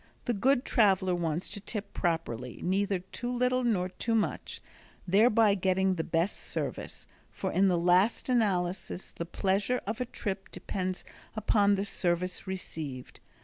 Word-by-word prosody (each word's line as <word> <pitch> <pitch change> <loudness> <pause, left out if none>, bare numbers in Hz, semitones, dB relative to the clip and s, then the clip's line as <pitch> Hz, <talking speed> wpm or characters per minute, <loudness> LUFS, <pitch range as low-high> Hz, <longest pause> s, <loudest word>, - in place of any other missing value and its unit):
The 240 - +1
good 255 +5 +2
traveler 190 -6 +3
wants 170 -1 -1
to 205 - -5
tip 205 0 -5
properly, 125 - -2
neither 195 +2 +1
too 190 +7 -6
little 250 +1 +1
nor 200 -7 +1
too 225 +4 -1
much, 220 - -1 0.5
thereby 215 +2 +5
getting 190 0 +2
the 165 -3 -2
best 165 +4 0
service, - - -4 0.2
for - - -4
in 195 +1 +4
the 180 -2 +3
last 180 +6 +3
analysis 190 -7 0
the 170 - -5
pleasure 200 +7 0
of 215 +5 -3
a - - 0
trip 195 -4 -5
depends 185 -1 -4 0.3
upon 205 -1 +3
the 195 +1 -1
service 180 -1 -1
received. 155 -8 -6
190 Hz, 145 wpm, -30 LUFS, 180-215 Hz, 0.5 s, thereby